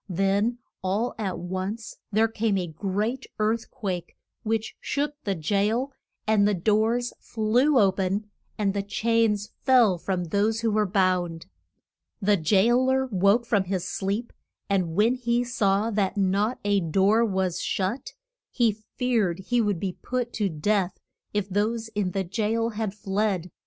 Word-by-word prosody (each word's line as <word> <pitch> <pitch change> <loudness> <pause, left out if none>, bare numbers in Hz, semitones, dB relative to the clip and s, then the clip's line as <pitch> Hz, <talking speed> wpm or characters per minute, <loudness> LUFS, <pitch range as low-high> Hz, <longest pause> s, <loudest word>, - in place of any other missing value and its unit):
Then 195 +6 +1 0.2
all 200 +6 -1
at 195 -4 -2
once 185 +5 -4 0.2
there 220 +2 +3
came 225 -2 0
a 180 - -1
great 205 - -2
earth 220 +2 0
quake 185 -8 -5 0.3
which 220 -1 -2
shook 290 +1 -1
the 200 -2 0
jail, 210 - 0 0.3
and 215 -2 +4
the 210 - +2
doors 220 +6 +1
flew 240 +6 +2
o 200 -5 +5
pen, 195 +2 -1 0.3
and 200 -2 +1
the 200 - 0
chains 210 0 +1
fell 240 -9 +5
from 185 0 -2
those 205 +6 0
who 230 -1 +1
were 210 0 +2
bound. 180 -3 +1 0.7
The 205 +1 +3
jail 210 +9 +3
er 265 0 +2
woke 200 +5 +3
from 205 -5 +1
his 185 -1 -2
sleep, 205 +5 -2 0.3
and 185 -5 0
when 215 +5 +4
he 240 -1 0
saw 215 -2 +1
that 205 -2 0
not 200 +5 +1
a 205 -1 +3
door 195 +6 +3
was 190 -5 0
shut, 200 +7 -2 0.4
he 235 -3 +2 0.2
feared 225 -9 +1
he 245 -1 +3
would 205 -5 0
be 185 -1 -4
put 250 -1 -2
to 205 -3 0
death 185 +3 0 0.3
if 205 -2 -1
those 220 +3 -1
in 205 -4 -1
the 190 +1 -1
jail 220 +4 0
had 215 -3 -3
fled. 195 -3 -1
205 Hz, 155 wpm, -26 LUFS, 190-230 Hz, 0.7 s, o